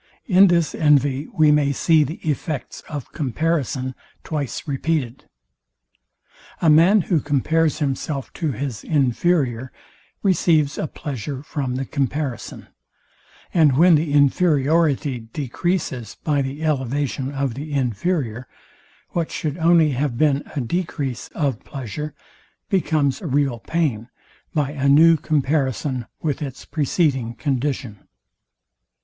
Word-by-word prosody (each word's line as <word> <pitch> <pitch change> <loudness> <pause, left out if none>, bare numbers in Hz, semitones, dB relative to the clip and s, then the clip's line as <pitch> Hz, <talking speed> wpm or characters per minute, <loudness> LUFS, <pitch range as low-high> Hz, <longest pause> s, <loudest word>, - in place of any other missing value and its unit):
In 195 -2 +6
this 170 -3 +2
envy 145 -2 +2
we 155 -1 +4
may 145 -1 +3
see 155 +3 +3
the 150 +4 -5
effects 150 -1 -3
of 145 -5 -6
comparison 140 -2 -1 0.3
twice 145 -2 -4
repeated. 140 -3 -2 1.3
A 160 - +4
man, 175 +7 +6
who 170 -1 +1
compares 150 +2 +1
himself 140 -1 -3
to 160 -5 -2
his 130 -4 -5
inferior, 130 -3 +1 0.5
receives 165 -6 +2
a - - -1
pleasure 140 -1 -6
from 135 -4 -3
the 135 +1 -2
comparison: 140 -1 -3 0.9
And 150 -6 +4
when 175 +3 +6
the 155 -1 +2
inferiority 145 -1 +2
decreases 130 - -3
by 145 -2 +1
the 135 +3 -4
elevation 135 -2 -1
of 135 -3 -2
the 145 +5 -7
inferior, 130 - -1 0.6
what 170 -2 -2
should 155 +1 -4
only 165 -2 +4
have 135 -2 -1
been 145 -1 +3
a 140 - 0
decrease 140 -3 -3
of 140 -8 -1
pleasure, 140 +3 -6 0.5
becomes 155 -7 +1
a 180 - -5
real 135 -3 +1
pain, 125 -5 -1 0.4
by 145 -3 0
a 140 -2 0
new 165 +4 +7
comparison 135 -4 -1 0.2
with 150 -2 -1
its 135 -3 -6
preceding 140 -6 0
condition. 130 -5 -3
145 Hz, 120 wpm, -22 LUFS, 130-160 Hz, 1.3 s, new